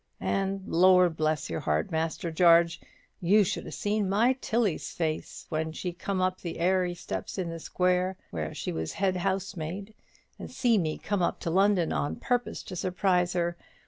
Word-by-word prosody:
And, 195 0 -1
Lor' 180 +1 +5
bless 155 -1 -1
your 80 - -3
heart, 75 0 -1
Master 165 +1 -2
Jarge, 170 0 +5 0.4
you 205 +4 +5
should 185 - -3
have - - -7
seen 205 -1 0
my 225 +6 +4
Tilly's 210 -11 0
face 160 -2 -3
when 160 0 -2
she 180 +2 -4
come 190 +2 -3
up 185 0 0
the 170 - -5
airey 180 0 +1
steps 175 +3 -5
in 180 -3 -2
the 165 - -6
square 180 +2 0
where 75 -3 -3
she - - -4
was 80 0 -3
head 190 -2 0
housemaid, 195 +1 -3 0.5
and - - -7
see 235 -4 +2
me 155 -3 -1
come 205 -2 -2
up 175 - 0
to 165 - -2
London 190 -1 +3
on 75 +1 -1
purpose 245 - -2
to 185 - -8
surprise 180 0 +1
her. 175 -1 0
180 Hz, 175 wpm, -28 LUFS, 165-195 Hz, 0.5 s, Lor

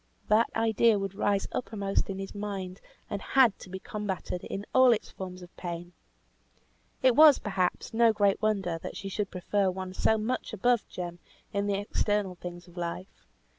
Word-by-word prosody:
That 220 +2 +4
idea 225 0 +3
would 195 -1 -3
rise 200 0 0
uppermost 200 -5 -2
in 195 - -3
his 195 0 -6
mind, 195 -3 -5 0.3
and 200 - -4
had 255 -6 +4
to - - -11
be 190 - -5
combated 195 -3 -4
in 200 +1 -5
all 260 -1 +7
its 225 - 0
forms 185 -1 -7
of 175 - -14
pain. 175 0 -6 1.1
It 255 -2 +5
was, 300 -2 +9
perhaps, 190 -2 -2
no 230 0 +5
great 205 -2 +2
wonder 195 -6 0
that - - -6
she 195 - -5
should 200 0 -2
prefer 195 +2 0
one 185 0 -5
so 220 +3 +2
much 240 +3 -2
above 240 +2 +2
Jem 175 -1 -6 0.3
in 200 0 0
the 200 - +1
external 205 -1 0
things 175 0 -9
of 175 0 -17
life. 175 +2 -6
200 Hz, 175 wpm, -29 LUFS, 185-215 Hz, 1.1 s, was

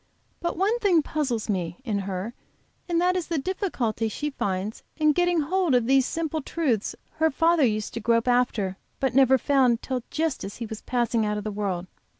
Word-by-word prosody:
But 340 - -2
one 415 +6 +2
thing 360 -8 +3
puzzles 265 -9 -2
me, 175 -5 -2
in 210 -4 0
her, 195 +3 -4 0.6
and 340 -1 +2
that 360 +1 +2
is 360 -3 -2
the 335 - -1
difficulty 270 - -1
she 295 +7 -3
finds 200 -3 -3 0.2
in 305 -1 +4
getting 350 +1 +2
hold 345 -1 +1
of 245 -2 +3
these 265 +1 +4
simple 320 -1 -2
truths 265 -9 -1 0.2
her 320 +1 +3
father 330 +2 +3
used 215 -4 0
to 230 - -3
grope 230 +2 +2
after 235 -6 +1 0.2
but 265 -2 0
never 265 0 +6
found 255 -3 +2
till 255 -2 -2
just 315 -3 -1
as 200 - -6
he 235 - -4
was 220 -1 -7
passing 235 -2 0
out 210 0 0
of 210 - -4
the 215 - -3
world. 195 -4 -2
255 Hz, 195 wpm, -26 LUFS, 215-320 Hz, 0.6 s, never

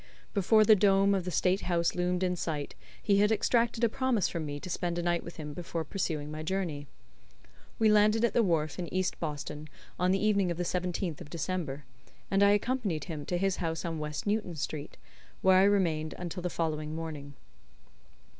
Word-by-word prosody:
Before 215 +2 +4
the 215 - +8
dome 195 0 +4
of 190 -3 0
the - - -2
State 185 +2 +1
House 170 -2 +1
loomed 180 +1 0
in 180 -1 +1
sight 155 -4 -3 0.3
he 200 -1 +3
had 210 +1 +4
extracted 230 +2 +1
a - - +6
promise 245 -2 +1
from 165 -3 -4
me 145 0 -5
to - - -7
spend 175 -1 -2
a 175 - -1
night 175 0 0
with 170 - -9
him 150 -2 -6
before 165 0 -4
pursuing 150 -3 -3
my 155 0 -5
journey. 160 -4 -3 0.9
We 220 - +3
landed 215 +2 +4
at - - -1
the 235 - +4
wharf 165 -5 0
in 175 - -4
East 185 0 -1
Boston 150 -1 -5 0.3
on 180 +1 +2
the 190 - +3
evening 200 -2 +2
of 170 - -2
the 175 - -1
17th 180 -2 -2
of - - -9
December, 155 -4 -3 0.5
and 195 0 +3
I 200 - +7
accompanied 205 -5 0
him 155 -4 -6
to 175 - 0
his 195 +1 0
house 165 -1 -3
on 165 -2 -3
West 150 0 -4
Newton 205 -4 -1
Street, 145 0 -5 0.5
where 190 0 +6
I - - +6
remained 165 -6 +1
until 180 0 -5
the 180 - -2
following 155 -2 -2
morning. 150 -3 -6
180 Hz, 200 wpm, -30 LUFS, 155-195 Hz, 0.9 s, the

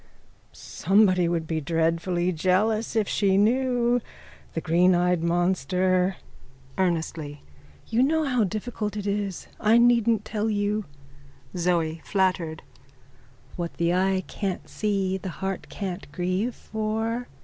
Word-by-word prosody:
_ - - -32 0.5
Somebody 185 -1 +2
would 170 -2 -1
be 160 0 -2
dreadfully 165 +3 0
jealous 205 +7 +1
if 215 -3 +2
she 195 -2 +2
knew. 245 +2 +2 0.5
The - - 0
greeneyed 180 +1 +3
monster. 180 +2 +1 0.6
(Earnestly.) 160 -5 -2 0.4
You 225 +2 +1
know 315 +4 +2
how 250 -5 +1
difficult 210 +1 -3
it 205 - -4
is. 200 -2 -2
I 220 +2 +4
needn't 235 -3 +4
tell 215 0 -1
you. 205 0 0 0.7
ZOE: 165 -2 0
(Flattered.) 185 -5 0 0.9
What 170 -1 -4
the 170 0 +1
eye 190 +1 +1
can't 195 -3 -4
see 195 -3 -1
the 190 - -5
heart 195 0 -4
can't 185 -6 -6
grieve 185 +9 -1
for. 225 +2 -3
190 Hz, 120 wpm, -25 LUFS, 175-215 Hz, 0.9 s, I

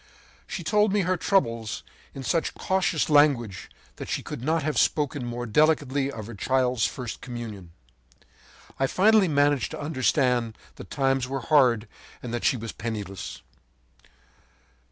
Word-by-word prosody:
“She - - -5
told 210 -1 +2
me 205 0 +2
her 185 +1 +1
troubles 115 - 0 0.3
in 135 - -6
such 165 +5 0
cautious 185 -3 0
language 140 -9 +3 0.3
that - - -7
she - - -2
could - - -7
not 160 +2 +1
have 155 0 0
spoken 145 -3 +1
more 120 0 -4
delicately 140 +1 +2
of 110 -5 -7
her 120 - -8
child's 125 +1 +1
first 125 -3 -6
communion. 110 -8 -7 1.1
I 135 - +2
finally 205 +4 +4
managed 145 -4 +2
to - - -6
understand 130 -5 +1 0.2
that - - -10
times 135 -2 0
were 135 0 -3
hard, 125 -6 +3 0.4
and 120 -2 -5
that 120 - -3
she 130 - +3
was 115 -1 -6
penniless. 105 -5 -6
130 Hz, 145 wpm, -26 LUFS, 115-155 Hz, 1.1 s, finally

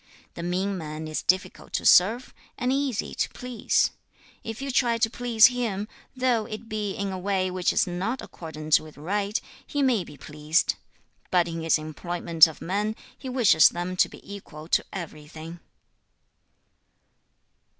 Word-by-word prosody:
The - - -7
mean 185 +3 -1
man 155 0 -6
is 155 - -3
difficult 185 0 -1
to - - -1
serve, 220 +8 +5 0.2
and 250 +1 0
easy 275 -5 -1
to - - -1
please. 245 -3 0 0.5
If 225 0 -6
you 275 0 -3
try 240 -2 +2
to 225 -1 +2
please 235 -3 +5
him, 230 -5 +1 0.3
though 250 -4 +1
it 215 +1 -7
be 210 -3 -3
in 200 -1 -3
a 185 - -4
way 190 -1 0
which 180 -1 +1
is - - +2
not 190 +8 -2
accordant 155 -2 -1
with 155 -3 -13
right, 200 +7 -1 0.2
he 290 -2 -1
may 245 -8 +2
be 150 -3 -13
pleased. 150 +2 0 0.6
But 175 -2 +3
in 165 -1 -4
his 165 0 +3
employment 165 +1 +3
of 160 - -10
men, 205 +4 -1 0.2
he 265 - -8
wishes 230 -11 +6
them 175 +1 -4
to - - +4
be - - -14
equal 155 -5 -11
to - - +3
everything.' 160 -1 -8
190 Hz, 160 wpm, -26 LUFS, 165-225 Hz, 0.6 s, wishes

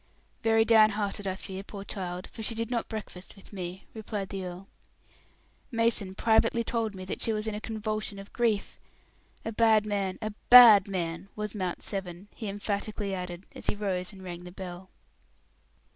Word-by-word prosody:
"Very 225 0 +4
down 220 -2 +7
hearted, 205 -1 -2
I 190 - -1
fear, 190 0 -7
poor 200 0 -8
child, 185 -3 -5
for 225 - -10
she 225 +1 +1
did 230 +1 -2
not 235 -2 -1
breakfast 210 -4 -7
with 195 +1 -17
me," 185 0 -6
replied 210 -3 -4
the 195 -1 -4
earl. 180 +2 -7 1.0
"Mason 230 -5 0
privately 230 +2 +3
told 225 -3 -1
me 185 0 -7
that 185 - -4
she 225 - +1
was 215 0 -2
in 220 - -2
a 210 - -5
convulsion 215 -2 -3
of 195 0 -11
grief. 225 -4 0 0.7
A 225 - -2
bad 220 -1 +4
man, 200 -3 -1
a 215 - -3 0.2
bad 230 -6 +10
man, 175 -1 -3
was 210 -1 -4
Mount 185 -4 -3
Severn," 190 -1 -5
he 220 - -6
emphatically 205 0 -3
added, 180 0 -5
as - - -7
he - - +1
rose 190 -3 -2
and 190 -2 -12
rang 175 -1 -7
the 180 - -9
bell. 185 0 -8
205 Hz, 180 wpm, -29 LUFS, 190-220 Hz, 1.0 s, bad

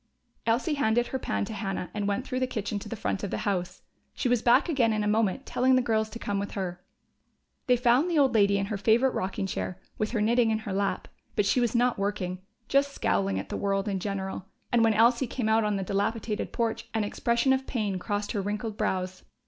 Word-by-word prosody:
Elsie 240 +8 +2
handed 240 -4 +2
her 265 - -3
pan 210 - -1
to 220 - -6
Hannah 195 -4 -4
and 205 -1 -2
went 205 +6 -1
through 255 -2 -2
the 255 - +1
kitchen 210 -3 -3
to - - -9
the 230 - -4
front 205 -2 -2
of 200 - -2
the - - -2
house. 185 -4 -2 0.3
She - - -1
was 245 -2 +2
back 240 +6 +4
again 250 -9 +2
in 215 -1 0
a - - 0
moment, 220 +4 +1
telling 260 +1 +3
the 255 - +4
girls 220 -2 +1
to 230 - -7
come 205 -3 -2
with 200 - -4
her. 180 -2 -4 0.8
They 250 -1 +5
found 250 +7 +3
the 335 - +1
old 270 -4 +4
lady 200 -2 +4
in 195 - 0
her 205 +1 -3
favorite 235 +5 +3
rocking 190 +1 -2
chair, 185 -1 -4 0.2
with 215 - 0
her 235 - -1
knitting 230 +2 +3
in 220 - +2
her 215 -3 -5
lap. 200 +1 -1 0.3
But 205 - +2
she 200 - +3
was 240 -1 0
not 245 -2 +2
working 195 -3 -2 0.3
just 280 0 +2
scowling 95 0 +1
at 95 - -5
the - - -3
world 195 0 0
in 195 -2 -1
general, 190 -1 -4 0.2
and 235 -1 +4
when 225 -1 +4
Elsie 235 +3 +4
came 235 -1 -2
out 220 0 +3
on 210 -1 0
the 195 - -1
dilapidated 210 +3 -2
porch 230 0 -2
an 220 - +2
expression 235 +5 +1
of 265 0 -1
pain 210 -7 -1
crossed 205 +2 -2
her 205 - -1
wrinkled 210 +2 -3
brows. 185 -3 -2
215 Hz, 235 wpm, -28 LUFS, 200-240 Hz, 0.8 s, They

